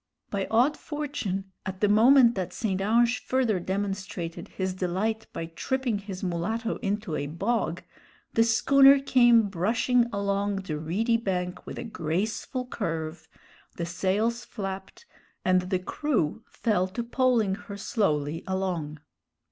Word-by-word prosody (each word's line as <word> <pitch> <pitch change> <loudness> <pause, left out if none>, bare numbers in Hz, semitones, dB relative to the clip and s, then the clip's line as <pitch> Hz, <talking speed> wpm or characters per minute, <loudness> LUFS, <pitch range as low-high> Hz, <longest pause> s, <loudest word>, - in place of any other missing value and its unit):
By 195 -2 -1
odd 250 +7 +3
fortune, 225 -11 -4
at 190 0 -5
the 210 - +3
moment 235 +4 +6
that 185 -5 -4
St. 195 -4 -1
Ange 235 +4 +2
further 245 -7 +1
demonstrated 190 -2 -4
his 190 -1 -3
delight 195 +5 -2
by 165 - -4
tripping 230 +7 -2
his 195 -2 -7
mulatto 205 +7 -2
into 205 -5 -2
a 145 - -2
bog, 180 +1 -1 0.5
the 225 - +5
schooner 275 +4 +6
came 240 -5 +5
brushing 225 +6 +2
along 200 0 0
the 185 -6 -4
reedy 210 +9 +1
bank 180 -5 -3
with - - -6
a - - -4
graceful 215 - -2
curve, 165 -9 -4 0.5
the 170 - -2
sails 200 +7 0
flapped, 195 - -7 0.4
and 185 0 +2
the 185 - +2
crew 225 - -1
fell 185 -5 0
to 235 +6 -4
poling 235 -4 +2
her 200 0 -7
slowly 165 -7 -1
along. 180 -6 -2
200 Hz, 135 wpm, -27 LUFS, 185-230 Hz, 0.5 s, moment